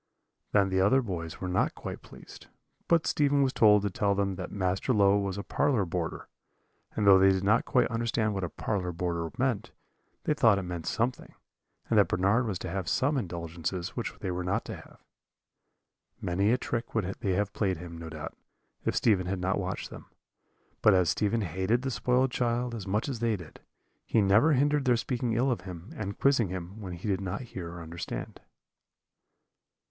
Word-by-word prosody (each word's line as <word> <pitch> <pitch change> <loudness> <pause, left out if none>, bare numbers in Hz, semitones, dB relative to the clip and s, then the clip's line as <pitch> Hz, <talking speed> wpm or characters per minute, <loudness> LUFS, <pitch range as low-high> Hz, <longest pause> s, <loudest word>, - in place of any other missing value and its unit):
"Then 100 -2 +3
the 95 0 +2
other 105 +8 +5
boys 85 -6 -5
were 95 - -4
not 90 0 +1
quite - - -7
pleased; - - -14 0.4
but 165 -2 +3
Stephen 145 -1 +2
was 130 -1 +1
told 105 -2 +5
to 100 - -1
tell 100 +2 +1
them 100 -1 0
that 90 -1 -6
Master 95 +5 0
Low 100 -2 +4
was 100 -1 -2
a 100 - -4
parlour 130 -7 +1
boarder; 85 -1 -4 0.7
and 105 - 0
though 95 -1 +8
they 95 +1 +6
did 95 0 0
not 110 +4 +3
quite 125 -2 +3
understand 115 -2 0
what 95 -1 -3
a 90 - -2
parlour 95 -2 -2
boarder 85 -1 -2
meant, 120 -4 0 0.5
they - - +2
thought 115 -8 +4
it 100 - -2
meant 90 -2 -5
something, 120 +3 -2 0.5
and - - +4
that - - +5
Bernard 100 +7 +2
was 100 -4 -2
to - - -6
have 95 -2 -2
some 145 +3 +1
indulgences 85 - -3
which - - -4
they 95 - -2
were 90 0 -3
not 90 - -1
to - - -5
have. - - -16 1.2
"Many 95 +4 +1
a 125 - +3
trick 120 -2 -4
would 110 -5 +1
they 95 - 0
have 100 +2 -1
played 95 -4 0
him, 85 0 -9
no 80 -1 -7
doubt, 80 0 -7 0.5
if - - -1
Stephen 95 -5 +2
had 95 +1 -1
not 95 +2 0
watched 95 -1 -4
them. - - -10 0.7
But 105 -3 +6
as 90 -3 +3
Stephen 105 +8 0
hated 95 +7 0
the 135 - -1
spoiled 125 +1 +1
child 120 0 0
as 105 -4 -6
much 105 +7 0
as 130 -5 -3
they 115 -1 +1
did, 90 -6 -11 0.4
he - - +1
never 105 +10 +5
hindered 145 +1 +2
their 125 -2 +4
speaking 120 0 -1
ill 125 +4 +2
of 115 - -2
him, 90 0 -9
and 100 -2 -5
quizzing 135 -6 +3
him, 95 +3 -6
when 95 -3 -6
he 85 +5 -6
did 100 -2 0
not 95 +1 -3
hear 90 -9 -7
or 85 -1 -8
understand. 85 +1 -6
100 Hz, 200 wpm, -29 LUFS, 90-115 Hz, 1.2 s, though